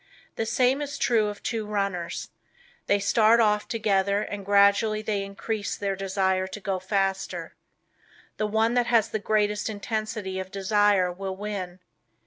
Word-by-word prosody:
The 225 - -2
same 255 +4 +2
is 285 -1 -4
true 225 -3 +2
of 205 -1 -7
two 225 -2 -2
runners. 195 -5 -2 0.6
They 200 - +4
start 220 +3 +4
off 210 -2 +2
together 200 -2 +1
and 205 -1 -6
gradually 200 +2 +3
they 210 -2 -1
increase 205 +2 -4
their 200 -1 -2
desire 190 -1 0
to 190 - -7
go 195 -1 -2
faster. 195 0 -2 0.8
The 215 - 0
one 220 +2 +1
that 245 -1 +2
has 230 -3 +3
the 220 - -2
greatest 210 0 0
intensity 215 -2 -3
of 190 0 -5
desire 200 -1 +2
will 190 +1 -5
win. 190 -3 -5
205 Hz, 150 wpm, -26 LUFS, 195-215 Hz, 0.8 s, They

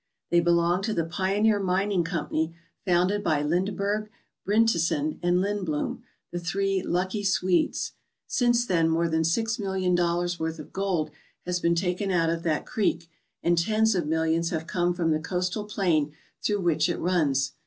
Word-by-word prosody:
They 175 - +5
belong 170 +1 +2
to 215 +2 -2
the 165 - 0
Pioneer 200 +5 +1
Mining 190 0 +1
Company, 165 -1 -2 0.3
founded 185 +3 +2
by 150 -3 +1
Lindeberg, 200 +6 -1 0.3
Bryntesen, 170 -8 +1
and 175 +1 +2
Lindbloom, 190 -7 -2 0.3
the 175 - -3
"three 195 +2 0
lucky 185 +4 -1
Swedes/' 185 -2 +1 0.3
Since 240 -1 +2
then 165 -6 +2
more 165 +1 +2
than 160 0 +1
six 225 +8 0
million 190 -2 0
dollars' 175 0 0
worth 160 0 -2
of 155 - -11
gold 185 -6 -1 0.3
has 180 0 -1
been 170 0 +2
taken 180 +3 -1
out 165 -3 +2
of 165 0 -2
that 160 -3 -1
creek, 170 -5 -1 0.3
and 175 - +3
tens 215 +6 +2
of 175 -5 -1
millions 160 +1 +1
have 160 -2 -3
come 175 +1 0
from 165 -2 +1
the 155 - +2
coastal 180 +5 -2
plain 170 -8 0 0.3
through 205 -2 0
which 175 0 +2
it 175 - -1
runs. 150 -7 +1
175 Hz, 165 wpm, -26 LUFS, 165-195 Hz, 0.3 s, They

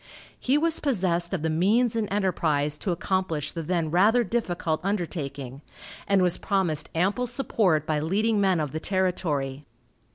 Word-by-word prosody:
He 265 +3 +2
was 325 +1 +1
possessed 180 - 0
of 185 -6 -2
the 160 - +1
means 215 +9 +2
and 220 -3 -1
enterprise 160 -7 0
to - - -3
accomplish 175 -4 -1
the 165 - -4
then 165 -1 -1
rather 215 +8 +4
difficult 175 -7 -1
undertaking, 145 -9 -4 0.5
and 195 -2 +3
was 180 -1 +1
promised 175 -7 -1
ample 200 +9 +1
support 215 - +1
by 155 -1 0
leading 205 +7 +1
men 190 -3 +3
of 150 -3 -2
the 160 - -3
territory. 160 -7 -1
180 Hz, 155 wpm, -26 LUFS, 155-205 Hz, 0.5 s, rather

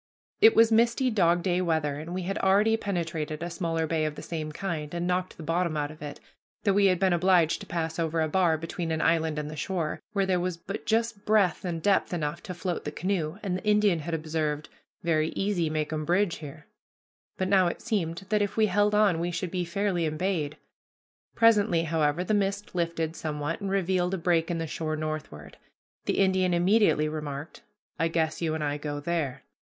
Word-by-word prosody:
It 445 +2 +7
was 230 0 +6
misty 235 +3 +3
dog 175 -5 +3
day 180 -1 +1
weather, 160 -4 0
and 160 +3 -7
we 185 +1 -3
had 195 +2 -2
already 205 +3 +4
penetrated 165 -6 -3
a 175 - -4
smaller 165 -2 -1
bay 160 0 0
of 155 -1 -3
the - - -8
same 155 -2 -4
kind, 155 -3 -4
and 170 0 -2
knocked 180 +1 -1
the 165 - -8
bottom 165 0 0
out 145 0 -2
of 155 - -14
it, 150 -1 -7 0.4
though 200 - +3
we 200 0 +5
had 185 -1 +3
been 190 -2 +3
obliged 175 -2 +3
to - - -9
pass 165 -1 -3
over 165 0 0
a 160 - +2
bar 165 0 +2
between 165 +1 -4
an 160 - 0
island 160 -1 +1
and 150 -1 -3
the 155 - -7
shore, 165 0 -2
where 200 -2 +2
there 185 -1 +1
was 180 -1 -2
but 195 +4 -7
just 225 -2 0
breadth 210 -5 +2
and 170 -3 -3
depth 195 -3 +2
enough 150 -3 -3
to 180 - -7
float 175 0 -3
the - - -4
canoe, 180 -3 -2
and 190 -3 -1
the 185 - -5
Indian 210 -4 +3
had 165 +2 -3
observed, 155 -1 -2 0.3
"Very 160 -2 +2
easy 195 -5 0
makum 155 0 -2
bridge 175 +2 +1
here," 150 0 -10 0.7
but 185 - 0
now 190 -2 +4
it 170 - -3
seemed 195 -5 -2
that 210 0 +2
if 205 +1 -2
we 220 - +5
held 205 +1 +2
on 205 -6 +4
we 170 +1 -1
should 175 0 -3
be 180 -1 -1
fairly 175 -1 0
embayed. 155 -2 -2 0.8
Presently, 210 -7 +4
however, 160 0 +1
the 200 - -1
mist 200 0 -1
lifted 165 -2 -1
somewhat 150 +3 -3
and 200 - -2
revealed 185 -1 +1
a - - -3
break 165 -1 +1
in 170 - -1
the 165 - -2
shore 155 0 -3
northward. 155 - -6 0.5
The - - 0
Indian 185 -2 +3
immediately 180 -3 +3
remarked, 150 0 -6 0.4
"I 165 - +3
guess 160 -1 -1
you 160 -2 0
and 155 - -2
I 145 0 -1
go 145 0 -4
there." 150 -3 -2
170 Hz, 210 wpm, -27 LUFS, 155-190 Hz, 0.8 s, It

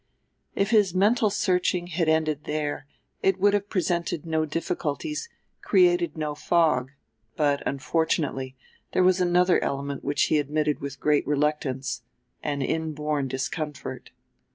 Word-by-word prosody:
If 200 +2 +1
his 205 -5 +4
mental 215 +3 +3
searching 180 -3 +1
had 170 -2 0
ended 155 -2 +1
there 145 -1 -3 0.3
it 190 -1 +2
would 205 +1 +4
have 205 0 0
presented 175 -4 -1
no 160 -1 0
difficulties, 165 - -3 0.3
created 355 - +3
no 150 -1 -2
fog; 150 -5 +2 0.5
but, 145 -2 +1
unfortunately, 140 -2 -1 0.4
there 185 - +3
was 185 0 +4
another 180 0 +3
element 140 0 -3
which 145 0 +1
he 155 - +3
admitted 150 +1 0
with 140 -1 -6
great 150 -1 +2
reluctance, 145 -3 -1 0.4
an 145 -2 -2
inborn 150 -2 -1
discomfort. 140 - -4
155 Hz, 130 wpm, -26 LUFS, 145-180 Hz, 0.5 s, his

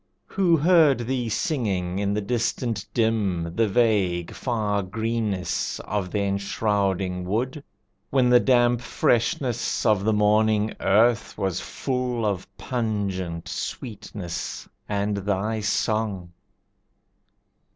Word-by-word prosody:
Who 180 -4 +2
heard 155 -5 +5
thee 125 -1 -1
singing 100 - -1
in 100 0 0
the 105 - 0
distance 115 -1 -1
dim, 100 -8 0
The 115 -1 +3
vague, 100 -6 +1
far 105 -5 -1
greenness 110 -2 -2
of 100 -3 -3
the 105 +2 -1
enshrouding 100 -2 0
wood, 125 +10 -2 0.5
When 130 -2 +3
the 125 - +8
damp 120 -2 +3
freshness 120 +1 0
of 105 -4 +3
the 110 - +2
morning 105 0 +3
earth 115 +4 +2
Was 95 -3 -1
full 125 -3 -2
of 100 -3 -1
pungent 100 -8 -3
sweetness 105 -6 -5 0.2
and 100 0 0
thy 100 +2 -1
song? 105 -3 -1
105 Hz, 110 wpm, -24 LUFS, 100-120 Hz, 0.5 s, the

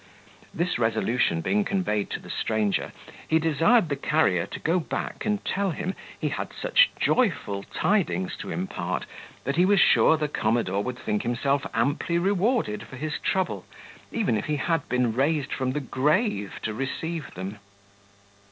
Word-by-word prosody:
This 170 -5 -1
resolution 110 -5 +1
being 210 - +1
conveyed 185 - -1
to - - -3
the - - -9
stranger, 110 -2 0 0.4
he 160 - +4
desired 165 - +3
the 145 - -1
carrier 135 - +2
to - - -7
go 170 +3 +1
back 175 - -4
and 210 -1 -1
tell 200 0 0
him, 180 +3 -3 0.3
he - - 0
had - - -4
such - - +5
joyful 175 - +1
tidings 190 -2 +1
to - - -7
impart, 185 +1 -3 0.4
that 140 +3 -2
he 175 - +6
was 200 0 +4
sure 160 - +5
the 150 - -1
commodore 110 -7 0
would 125 +3 -4
think 105 -4 -1
himself 135 +4 0
amply 140 +8 +1
rewarded 195 - +1
for - - -10
his 150 +3 -3
trouble, 190 -2 -1 0.5
even 210 - +1
if 105 - -3
he 150 - 0
had 165 +1 -1
been 125 -2 +1
raised 140 +3 +1
from 130 -1 -1
the 150 - -1
grave 145 - 0
to 110 - -2
receive 140 +4 -4
them. 95 +3 -6
150 Hz, 160 wpm, -26 LUFS, 120-185 Hz, 0.5 s, he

